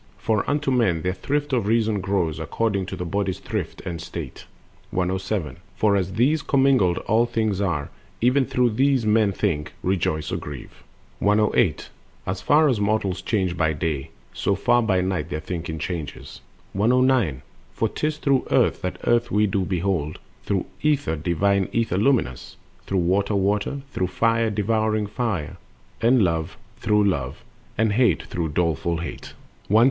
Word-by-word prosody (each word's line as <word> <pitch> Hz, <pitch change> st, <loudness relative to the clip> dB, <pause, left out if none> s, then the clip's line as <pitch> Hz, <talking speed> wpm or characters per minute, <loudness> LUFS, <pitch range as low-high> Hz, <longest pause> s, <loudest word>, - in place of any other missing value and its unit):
For 110 Hz, -2 st, 0 dB
unto 145 Hz, -1 st, 0 dB
men 95 Hz, -11 st, +2 dB
their 90 Hz, -, 0 dB
thrift 145 Hz, +8 st, -2 dB
of 115 Hz, -5 st, +1 dB
reason 110 Hz, -2 st, +2 dB
grows, 95 Hz, -5 st, -1 dB
According 100 Hz, -5 st, -1 dB
to 95 Hz, -, -5 dB
the 90 Hz, -, -5 dB
body's 100 Hz, +1 st, -1 dB
thrift -, -, -5 dB
and 85 Hz, -3 st, -5 dB
state. -, -, -7 dB, 0.4 s
107. 90 Hz, -3 st, -2 dB, 0.2 s
For 105 Hz, -2 st, +3 dB
as 95 Hz, -2 st, 0 dB
of -, -, -8 dB
these 145 Hz, +6 st, +3 dB
commingled 135 Hz, -12 st, +3 dB
all 115 Hz, +2 st, +3 dB
things 110 Hz, -4 st, -1 dB
are, 80 Hz, -8 st, -1 dB, 0.3 s
Even 125 Hz, +3 st, +3 dB
so -, -, -18 dB
through 125 Hz, -2 st, +3 dB
these 130 Hz, +1 st, +2 dB
men 105 Hz, -1 st, +3 dB
think, 85 Hz, -7 st, -2 dB
rejoice, 80 Hz, -4 st, 0 dB
or -, -, -1 dB
grieve. 75 Hz, -4 st, -9 dB, 0.4 s
108. 105 Hz, -4 st, +2 dB, 0.4 s
As 95 Hz, 0 st, -3 dB
far 150 Hz, +10 st, +4 dB
as 125 Hz, -7 st, +1 dB
mortals 100 Hz, -2 st, 0 dB
change 95 Hz, -3 st, 0 dB
by 80 Hz, -2 st, +1 dB
day, 75 Hz, -3 st, -2 dB, 0.2 s
so 100 Hz, -, 0 dB
far 120 Hz, +5 st, +3 dB
By 95 Hz, -5 st, +2 dB
night 90 Hz, -4 st, -2 dB
their 75 Hz, -, -3 dB
thinking 80 Hz, 0 st, -5 dB
changes... 80 Hz, -2 st, -6 dB, 0.3 s
109. 115 Hz, -, +2 dB, 0.3 s
For 115 Hz, -, 0 dB
'tis 150 Hz, +7 st, -2 dB
through 135 Hz, -3 st, +1 dB
Earth -, -, +2 dB
that 90 Hz, -, -3 dB
Earth 120 Hz, 0 st, +2 dB
we 105 Hz, +1 st, +3 dB
do 100 Hz, -1 st, 0 dB
behold, 85 Hz, -5 st, -1 dB, 0.3 s
Through 95 Hz, -2 st, 0 dB, 0.2 s
Ether, 145 Hz, -, +1 dB
divine 95 Hz, +5 st, +1 dB
Ether 115 Hz, -5 st, 0 dB
luminous, 105 Hz, -, 0 dB, 0.3 s
Through 95 Hz, -, 0 dB
Water, 100 Hz, +4 st, +1 dB
Water, 100 Hz, +7 st, 0 dB
through 95 Hz, -, -1 dB
Fire, 115 Hz, +4 st, +1 dB
devouring 110 Hz, +1 st, 0 dB
Fire, 105 Hz, -, -3 dB, 0.4 s
And 120 Hz, 0 st, +4 dB
Love 80 Hz, -3 st, -1 dB, 0.2 s
through 105 Hz, 0 st, +2 dB
Love, 70 Hz, -8 st, -1 dB, 0.3 s
and 110 Hz, -1 st, +2 dB
Hate 120 Hz, +2 st, +3 dB
through 85 Hz, -2 st, -3 dB
doleful 85 Hz, +1 st, 0 dB
Hate. 85 Hz, -, -7 dB, 0.3 s
110. 105 Hz, -, +4 dB
100 Hz, 160 wpm, -23 LUFS, 90-115 Hz, 0.4 s, far